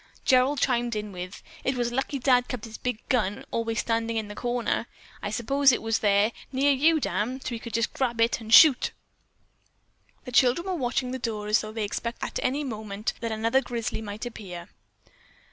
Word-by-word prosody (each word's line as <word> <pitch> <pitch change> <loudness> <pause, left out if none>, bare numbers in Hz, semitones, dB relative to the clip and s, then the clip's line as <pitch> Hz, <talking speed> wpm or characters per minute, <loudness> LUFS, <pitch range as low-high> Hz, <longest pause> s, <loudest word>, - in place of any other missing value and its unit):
Gerald 260 +2 +4
chimed 240 -3 +1
in 210 -1 -4
with: 180 +1 -8 0.2
"It 260 - 0
was 240 -1 -1
lucky 270 +3 -1
Dad 250 -1 +3
kept 245 -4 -5
his 225 -1 -10
big 250 -3 -4
gun 210 -5 0
always 230 0 -1
standing 230 0 -1
in 215 -2 -3
the - - -6
corner. 240 +1 -1 0.3
I - - -3
suppose 270 +6 +3
it 240 - 0
was 225 0 +1
right - - -10
there, 205 +1 +3 0.2
near 275 +2 +3
you, 310 +4 +4
Dan, 255 -1 -2
so - - -5
he 235 -2 -4
could 230 -1 -6
just 230 0 0
grab 240 -3 -1
it 230 0 +2
and 220 0 -8
shoot." 275 +1 +7 1.3
The 250 - -7
children 255 +7 +3
were 380 - -2
watching 255 -4 -1
the 260 - -4
door 220 -3 -3
as 210 0 +3
though 215 - -7
they 220 0 -3
expected 235 +3 -4
at - - -4
any 275 +4 0
minute 215 -4 -4
that 230 -1 -3
another 230 +4 +2
grizzly 235 -3 -4
might 210 +1 -6
appear. 190 -6 -8
235 Hz, 200 wpm, -26 LUFS, 215-255 Hz, 1.3 s, shoot